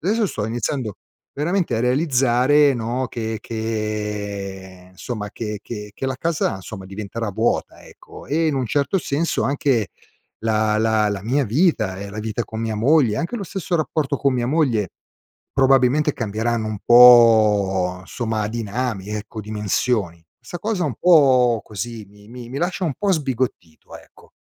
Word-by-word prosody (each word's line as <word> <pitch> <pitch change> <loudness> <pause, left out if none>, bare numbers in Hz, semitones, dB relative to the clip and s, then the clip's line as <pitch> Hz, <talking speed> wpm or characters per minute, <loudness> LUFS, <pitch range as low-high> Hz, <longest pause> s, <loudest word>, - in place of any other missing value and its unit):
adesso 215 +6 +1
sto 105 - -3
iniziando 120 -1 -3 0.4
veramente 165 -3 0
a - - -1
realizzare 135 +1 +3
no, 120 +2 -2
che 110 -1 -3
che, 105 -4 -4
ehm, - - -19
insomma 105 +2 -6
che 105 -2 -5
che 105 -3 -7
che 135 - -4
la 130 - -2
casa 165 +3 -1
insomma 95 0 -9
diventerà 105 +3 -5
vuota 110 +4 -1
ecco, - - -14
e 160 +3 +1
in 155 - +1
un 130 -2 -1
certo 140 - 0
senso 160 0 -1
anche 135 -6 +1 0.5
la 110 -1 +1
la 110 -1 +2
la 100 -2 -3
mia 135 +5 +1
vita 110 - +1
e 100 - -6
la 105 +2 -6
vita 110 +2 -3
con 110 -1 -7
mia 110 -1 -2
moglie, 125 0 +3
anche 170 +9 -3
lo 205 - -5
stesso 190 -2 -3
rapporto 150 -2 -1
con 140 -1 +1
mia 120 -1 -1
moglie, 125 - +1 0.6
probabilmente 135 +2 +3
cambieranno 110 0 -2
un 110 -1 -4
po' 105 -7 +6
somma 110 -2 -3
a 105 - -2
dinami 110 -2 -3
ecco 105 +1 -5
dimensioni. 105 -4 -2 0.2
Sta 175 - -8
cosa 205 -3 -1
un 140 -7 -2
po' 130 -9 +5
così 110 +1 -6
mi 105 +1 -18 0.2
mi 135 +3 -5
lascia 180 +2 -1
un 155 -6 -1
po' 205 -1 0
sbigottito, 130 - -3
ecco. - - -20
115 Hz, 160 wpm, -21 LUFS, 105-140 Hz, 0.6 s, po